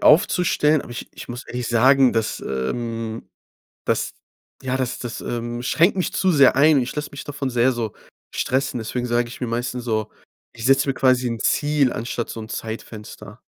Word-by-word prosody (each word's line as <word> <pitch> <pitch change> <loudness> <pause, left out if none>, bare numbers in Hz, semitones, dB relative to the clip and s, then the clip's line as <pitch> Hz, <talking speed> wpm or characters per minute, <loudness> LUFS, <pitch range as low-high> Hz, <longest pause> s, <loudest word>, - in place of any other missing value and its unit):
aufzustellen, 155 -3 +4
aber 120 - -9
ich 120 - -7
ich - - -10
muss 120 +1 -6
ehrlich 125 -1 -4
sagen, 130 +3 +5
dass, 115 -1 -1
ähm, 115 - -3 0.6
das, - - 0 0.5
ja 130 0 -1
das 130 -2 -2
das, 120 -2 -5
ähm, 120 0 -4
schränkt 170 +10 +3
mich 185 - -1
zu 190 - +2
sehr 140 -6 +6
ein. 145 +1 +6
Ich 120 - -4
lasse 150 0 -3
mich 140 - -8
davon 145 -2 -3
sehr 125 +1 +3
so 115 -3 -3 0.4
stressen, 130 0 0
deswegen 120 +2 -3
sage 120 0 +1
ich 120 - -10
mir 125 - -1
meistens 120 +1 -2
so, 110 -3 -1 0.4
ich 115 - -6
setze 135 +2 +4
mir 135 - +1
quasi 130 -1 +3
'n 115 -1 -3
Ziel 145 -3 +2
anstatt 115 0 -3
so - - -6
'n 110 - -7
Zeitfenster. 110 -1 -7
125 Hz, 185 wpm, -22 LUFS, 115-135 Hz, 0.6 s, sehr